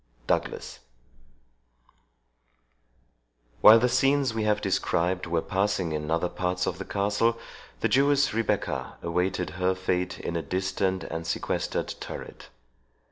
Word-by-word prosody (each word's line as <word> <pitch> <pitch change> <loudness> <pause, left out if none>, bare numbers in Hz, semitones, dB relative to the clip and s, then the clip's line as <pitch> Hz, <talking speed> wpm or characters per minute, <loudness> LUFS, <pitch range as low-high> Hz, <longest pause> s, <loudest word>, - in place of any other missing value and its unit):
DOUGLAS - - -2 2.8
While 110 +1 +10
the 125 +2 +3
scenes 135 0 +2
we 110 -1 -1
have 105 -1 +2
described 90 +1 0
were 85 -1 0
passing 95 -3 0
in 75 0 -3
other 85 +2 +1
parts 90 0 -2
of 90 - -3
the 100 - -5
castle, 105 +3 +1 0.4
the - - +3
Jewess 140 0 +3
Rebecca 115 -1 -1
awaited 90 +1 -1
her 95 +1 +2
fate 90 -1 -2
in 85 - -4
a 85 - 0
distant 95 +2 -1
and 80 0 -5
sequestered - - -2
turret. - - -8
95 Hz, 125 wpm, -27 LUFS, 90-110 Hz, 2.8 s, While